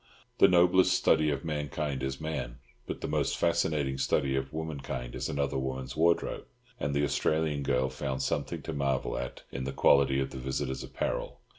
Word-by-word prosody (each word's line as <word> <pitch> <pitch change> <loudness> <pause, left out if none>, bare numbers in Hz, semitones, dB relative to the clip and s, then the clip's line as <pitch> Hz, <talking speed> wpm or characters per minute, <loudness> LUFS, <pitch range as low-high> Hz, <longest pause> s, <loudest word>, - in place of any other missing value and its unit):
The - - +8
noblest 90 0 +5
study 80 -1 +3
of 70 +1 -2
mankind 75 -2 -2
is 65 0 -3
man, 75 -6 -4 0.3
but - - -5
the - - -2
most - - 0
fascinating 75 -5 +1
study 65 0 +1
of 65 0 -2
womankind 70 -6 -4
is - - -3
another 70 -1 -1
woman's 65 -1 -4
wardrobe, 85 +2 +1 0.3
and 70 0 -1
the 70 - +2
Australian 75 0 +1
girl 65 -1 +1
found 65 0 -3
something - - -2
to 80 - -4
marvel 70 -2 0
at 60 - -5
in 65 - -4
the 65 - -3
quality 70 0 +4
of 65 0 -2
the 65 - -6
visitor's 65 +1 -3
apparel. - - -3
70 Hz, 175 wpm, -30 LUFS, 65-80 Hz, 0.3 s, The